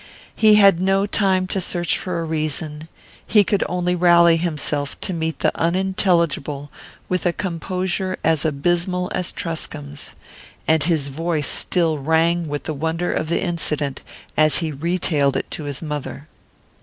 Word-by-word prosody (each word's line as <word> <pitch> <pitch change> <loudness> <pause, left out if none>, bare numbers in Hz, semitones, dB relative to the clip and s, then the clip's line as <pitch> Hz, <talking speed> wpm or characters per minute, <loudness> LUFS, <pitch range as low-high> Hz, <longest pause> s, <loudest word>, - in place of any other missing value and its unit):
He 215 -1 +6
had 195 -4 +6
no 195 +1 +2
time 190 -2 +1
to 190 +1 -2
search 175 -1 +1
for 180 -2 -3
a - - -2
reason; 155 -1 -3 0.4
he 210 -2 +5
could 200 +1 +1
only 180 0 0
rally 170 -1 +5
himself 150 -4 -2
to 190 - -3
meet 160 -1 -2
the - - +1
unintelligible 170 -5 0 0.4
with 180 0 0
a - - +3
composure 185 +1 -2
as 160 -2 +2
abysmal 175 +4 0
as 180 - -2
Truscomb's; 145 -3 -6 0.5
and 160 0 +3
his 155 -5 0
voice 160 +1 -2
still 165 -4 +1
rang 165 +3 +1
with 145 0 -4
the 155 - -3
wonder 165 +4 -2
of 155 - -2
the 170 - 0
incident 150 -5 -2 0.3
as 155 -1 +4
he 165 -2 -2
retailed 150 -2 +1
it - - -5
to 155 - -5
his 145 +2 -4
mother. 150 -1 -5
165 Hz, 155 wpm, -21 LUFS, 155-180 Hz, 0.5 s, He